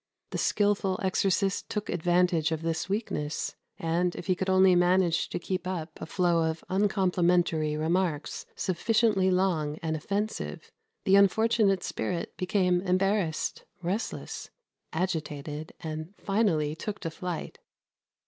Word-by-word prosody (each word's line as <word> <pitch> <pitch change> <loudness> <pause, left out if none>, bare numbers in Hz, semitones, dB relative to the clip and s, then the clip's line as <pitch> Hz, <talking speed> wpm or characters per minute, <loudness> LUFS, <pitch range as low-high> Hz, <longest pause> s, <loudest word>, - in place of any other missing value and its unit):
The - - -2
skilful 200 -2 +1
exorcist 195 +1 +1
took 210 - -3
advantage 175 -1 +2
of 160 0 -2
this 165 +2 -2
weakness, 190 -8 -2 0.2
and, 175 +2 0
if - - -6
he 185 - +3
could 190 +1 -2
only 190 0 +6
manage 175 -1 +3
to - - -3
keep 185 +1 -3
up 170 -4 -5
a - - -5
flow 170 -2 +2
of 160 0 -5
uncomplimentary 180 -5 +2
remarks 160 -1 -1
sufficiently 205 +1 +2
long 175 -5 +1
and 160 -1 0
offensive, 205 +7 -3 0.3
the 195 +1 +6
unfortunate 200 -1 +4
spirit 175 -2 -3
became 180 -1 +1
embarrassed, 185 -2 0 0.2
restless, 195 +7 -3 0.4
agitated, 155 -3 -3
and 155 +4 -6
finally 195 -8 +1
took 205 +5 -5
to 165 - -3
flight. 175 +1 -5
180 Hz, 125 wpm, -28 LUFS, 160-195 Hz, 0.4 s, only